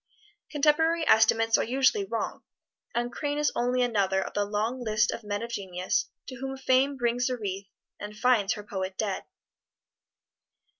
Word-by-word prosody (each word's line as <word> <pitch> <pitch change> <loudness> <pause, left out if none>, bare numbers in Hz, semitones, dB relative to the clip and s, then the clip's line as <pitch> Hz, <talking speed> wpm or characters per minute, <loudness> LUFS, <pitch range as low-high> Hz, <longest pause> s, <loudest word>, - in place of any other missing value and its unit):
Contemporary 320 +3 +2
estimates 225 +1 +4
are - - +2
usually 270 - +2
wrong, - - -3 0.5
and 240 +1 -1
Crane 290 +3 -3
is 295 0 +2
only 250 +1 +1
another 200 -5 +1
of - - -4
the 205 - 0
long 220 +5 -2
list 215 -1 +2
of 235 - -6
men 205 +1 -3
of 235 - -6
genius 185 -4 -2 0.2
to 255 - -7
whom 270 +1 -5
Fame 265 +1 +2
brings 245 0 0
a 250 - -2
wreath 195 -3 -5 0.3
and 210 +1 -8
finds 220 -4 +3
her 210 - -8
poet 190 -2 -5
dead. 205 -3 -2
235 Hz, 160 wpm, -27 LUFS, 205-260 Hz, 0.5 s, estimates